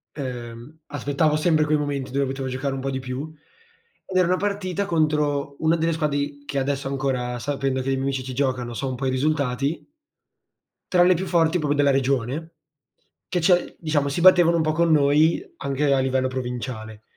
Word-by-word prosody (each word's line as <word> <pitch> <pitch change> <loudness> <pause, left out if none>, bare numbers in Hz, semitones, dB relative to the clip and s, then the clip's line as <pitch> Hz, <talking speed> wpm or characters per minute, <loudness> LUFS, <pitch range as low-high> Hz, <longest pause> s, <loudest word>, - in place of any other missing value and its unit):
Ehm, 125 +1 -7
aspettavo 145 +2 0
sempre 155 0 +3
quei 150 0 +2
momenti 145 -3 -3
dove 140 +1 +1
potevo 135 0 -4
giocare 130 +2 -2
un 135 - -4
po' 135 - -2
di 130 - -3
più, 130 +4 -5 0.7
ed 185 - -2
era 180 -2 +4
una 180 - +3
partita 200 -1 -2
contro 150 -5 0
una 160 +1 +2
delle 165 +1 +1
squadre 150 -3 -1
i 145 0 -4
che 140 -1 -2
adesso 135 0 -2
ancora, 130 -3 -2
sapendo 135 0 -1
che 130 - -6
i - - +2
miei 135 - -1
amici 135 -1 -1
ci 130 0 -6
giocano, 125 -3 -1
so 135 +3 -3
un 130 - -3
po' 135 +2 -4
i - - +2
risultati 140 +1 -1 1.0
tra 175 -1 +6
le 185 - +5
più 180 +2 -2
forti 165 -1 +2
proprio 150 -3 0
della 145 -1 +4
regione, 135 +4 -1 0.7
che 180 - 0
cioè 175 +1 +2
diciamo 150 -3 0
si 140 - -2
battevano 175 -2 +6
un 165 - +2
po' 155 0 +1
con 170 +1 +2
noi 150 - +4 0.2
anche 140 +1 0
a 135 - +3
livello 130 0 +1
provinciale. 120 -4 -5
140 Hz, 195 wpm, -23 LUFS, 130-160 Hz, 1.0 s, tra